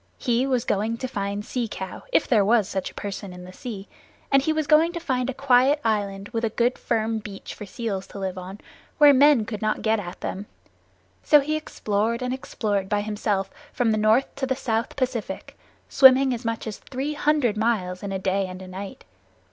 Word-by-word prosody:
He 245 +2 +1
was 255 -3 0
going 220 +3 0
to 255 - -4
find 200 -2 -3
Sea 245 -3 -2
Cow, 190 -3 -7
if - - +3
there 215 -5 +4
was 215 -1 +3
such 190 -1 -3
a - - -16
person 200 -1 -6
in 180 0 -10
the 185 +1 -11
sea, 210 -4 -7 0.4
and 275 -1 +5
he 315 - 0
was 310 -1 0
going 315 +3 +5
to 340 - -3
find 260 -6 -1
a - - +1
quiet 270 +2 +3
island 200 -2 -1
with 225 -2 -2
good 245 +1 +1
firm 225 -1 0
beaches 205 -2 -9
for 210 - -9
seals 200 -3 -4
to - - -11
live 190 -2 -3
on, 185 +2 -8 0.4
where 295 -2 +8
men 275 -4 +5
could 215 -2 -6
not 215 0 -1
get 220 0 +2
at 175 -2 -8
them. 200 +2 -4 0.7
So 300 - +6
he 300 +2 -1
explored 230 -5 -1
and 250 0 -1
explored 205 -6 -2
by 205 -1 +1
himself 205 -2 -2 0.2
from 245 -3 +1
the 215 - +1
North 220 +5 +3
to 270 -1 -1
the 260 - 0
South 235 -2 -2
Pacific, 255 -4 -3 0.3
swimming 265 0 +6
as 240 +1 -5
much 230 -1 -3
as 215 -3 -6
three 275 +3 -4
hundred 295 -7 +1
miles 210 -5 -1
in 200 - -5
a 195 - -1
day 190 +1 0
and 185 0 -8
a - - -10
night. 190 +2 -8
225 Hz, 210 wpm, -24 LUFS, 200-260 Hz, 0.7 s, where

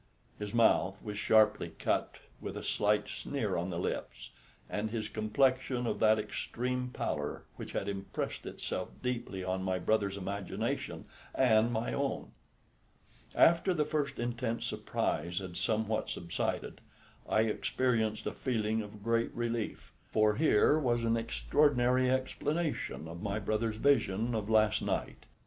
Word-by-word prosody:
His 105 -1 -4
mouth 100 -4 +3
was 105 -2 -5
sharply 105 -7 +4
cut, - - 0 0.3
with - - -5
a - - -6
slight - - +1
sneer - - -2
on 90 +2 -1
the 85 - -3
lips, - - -4 0.4
and 105 +1 -2
his 110 -1 -3
complexion 125 +4 +1
of - - -1
that 110 0 +5
extreme 125 +4 -2
pallor - - -3
which - - -8
had 100 - -2
impressed 100 -1 -4
itself 90 - -4
deeply 120 -6 -2
on 95 0 -1
my 95 -1 0
brother's 100 +1 +1
imagination 100 0 -3 0.3
and 115 -2 +4
my 115 0 -1
own. 140 -1 -2 1.0
After 170 +2 +5
the 150 -2 +2
first 145 -2 -1
intense 120 -1 -2
surprise 85 +3 -2
had 95 -2 -4
somewhat 110 +1 0
subsided, 85 -1 -3 0.5
I 110 - +4
experienced 110 0 0
a - - -2
feeling 110 -3 0
of 105 -1 -10
great 115 +1 +1
relief, 120 -2 -3 0.2
for 110 -1 +3
here 150 +2 +4
was 120 -4 +1
an 115 0 +3
extraordinary 125 +2 +2
explanation 140 - -1
of 85 +1 -8
my 100 0 -1
brother's 110 +1 -1
vision 115 -4 +2
of 110 -2 -2
last 110 -1 +4
night. - - -3
110 Hz, 140 wpm, -32 LUFS, 105-125 Hz, 1.0 s, that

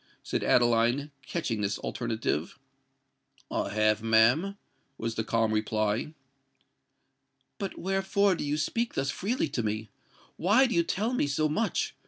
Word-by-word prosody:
said - - -2
Adeline, 120 +4 +3 0.2
catching 125 -10 -2
at - - -2
this 100 0 -1
alternative. 110 - -2 0.9
"I - - -1
have, 110 0 +2
ma'am," 120 - +3 0.4
was 115 0 -3
the 110 - -2
calm 115 0 +1
reply. 110 +6 -1 1.4
"But 195 -2 -4
wherefore 195 +1 +1
do 170 - -3
you 145 +1 -1
speak 230 +10 -1
thus 140 +1 0
freely 210 - -1
to 130 - -2
me? 110 0 -3 0.5
why 210 +10 +4
do 245 - -1
you 170 - +4
tell 210 +8 -1
me 245 - +1
so 150 +2 +1
much?" 185 +10 -1
135 Hz, 145 wpm, -28 LUFS, -, 1.4 s, why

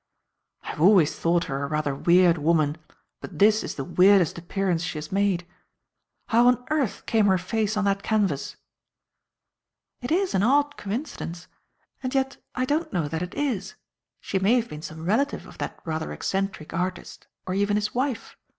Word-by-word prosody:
"I - - -8
have - - -5
always 180 -4 +5
thought 170 0 +1
her 135 +1 -4
a - - -2
rather 150 -1 -1
weird 175 +3 +4
woman, 155 0 +1 0.4
but 175 - -9
this 215 +4 +4
is - - -5
the 135 - -4
weirdest 185 +3 +4
appearance 180 0 -1
she 170 -2 -4
has 155 0 -7
made. 195 -3 +1 0.8
How 235 +2 +5
on 250 0 +3
earth 285 -8 -1
came 220 -2 +3
her 190 -1 +4
face 215 +3 -1
on 210 - +1
that 195 0 +1
canvas?" 200 -10 0 1.5
"It 245 - -5
is 370 +3 +1
an 190 - +2
odd 285 +6 +3
coincidence. 200 - -5 0.5
And 255 0 -3
yet 270 0 0 0.2
I 255 - 0
don't 305 +5 -1
know 170 -5 -1
that 160 +1 -3
it 180 0 -5
is. 265 -10 -2 0.4
She 190 - -2
may 200 +6 +3
have 235 -2 0
been 150 0 -8
some 160 +1 -8
relative 260 +10 0
of - - -14
that - - -5
rather 160 -1 -3
eccentric 195 -5 -3
artist, 180 +1 -4 0.2
or 185 - -3
even 205 +1 +1
his 210 0 -2
wife. 255 -2 -2
195 Hz, 180 wpm, -25 LUFS, 170-230 Hz, 1.5 s, always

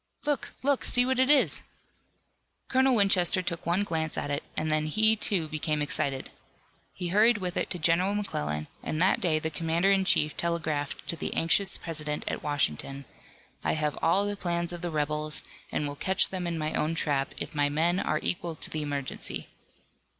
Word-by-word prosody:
"Look! 290 -1 -1
Look! 280 -1 +2
See 245 0 +4
what 260 0 0
it 260 +1 +4
is!" 290 -2 +4 1.1
Colonel 260 0 +4
Winchester 190 -3 +3
took 170 -2 -4
one 175 +4 +2
glance 160 -5 -2
at 145 - -2
it, 145 +2 -1 0.2
and 155 0 0
then 155 0 +1
he, 220 +7 +4
too, 190 -6 +2
became 155 0 -1
excited. 140 -2 0 0.6
He 180 -2 -4
hurried 215 +5 +5
with 180 -3 -3
it - - 0
to - - -3
General 175 +5 +2
McClellan, 75 - -2
and 155 - -3
that 185 +3 +3
day 165 -4 +2
the 160 +1 -2
commander 165 +5 +1
in 195 -1 +3
chief 150 -5 +2
telegraphed 160 -4 -2
to - - -2
the - - -4
anxious 190 +4 +3
President 150 -3 -2
at - - -3
Washington: 140 - -1 0.6
"I - - +1
have 150 -1 -1
all 190 +5 +3
the 205 0 -1
plans 175 -2 -1
of 175 - -6
the 175 - -2
rebels, 150 0 -2 0.3
and 150 - -1
will 145 - -5
catch 190 +6 +1
them 185 -2 -3
in 170 -1 -2
my 155 0 -2
own 155 +2 0
trap, 140 -4 -1
if - - -6
my 145 -1 +2
men 165 +5 +2
are 155 - 0
equal 170 -2 -2
to - - -4
the 155 - -2
emergency." 145 -2 -4
165 Hz, 190 wpm, -28 LUFS, 150-190 Hz, 1.1 s, hurried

